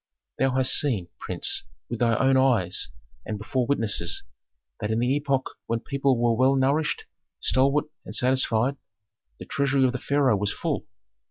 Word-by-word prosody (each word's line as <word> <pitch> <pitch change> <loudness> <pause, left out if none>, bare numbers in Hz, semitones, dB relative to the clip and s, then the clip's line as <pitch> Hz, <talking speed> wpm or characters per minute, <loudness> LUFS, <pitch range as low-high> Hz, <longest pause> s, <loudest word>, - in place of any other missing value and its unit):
"Thou 135 -1 +2
hast 130 -1 +4
seen, 110 -12 0
prince, - - -1 0.2
with 120 - -5
thy 115 -2 +2
own 135 0 +3
eyes 120 -9 +2 0.3
and 105 - -4
before 120 +4 -2
witnesses, 110 -10 0 0.6
that 105 - -3
in 110 - 0
the 125 +3 +1
epoch 140 -2 0 0.2
when 115 0 0
people 140 -1 0
were 120 -1 +3
well 130 +3 +3
nourished, 140 +4 +1 0.3
stalwart, 140 +3 +2 0.2
and - - -6
satisfied, 130 0 +2 0.6
the - - -9
treasury 140 -1 +1
of 125 - +2
the 125 - -4
pharaoh 140 -6 +2
was 100 +1 0
full. - - -3
130 Hz, 160 wpm, -25 LUFS, 115-135 Hz, 0.6 s, hast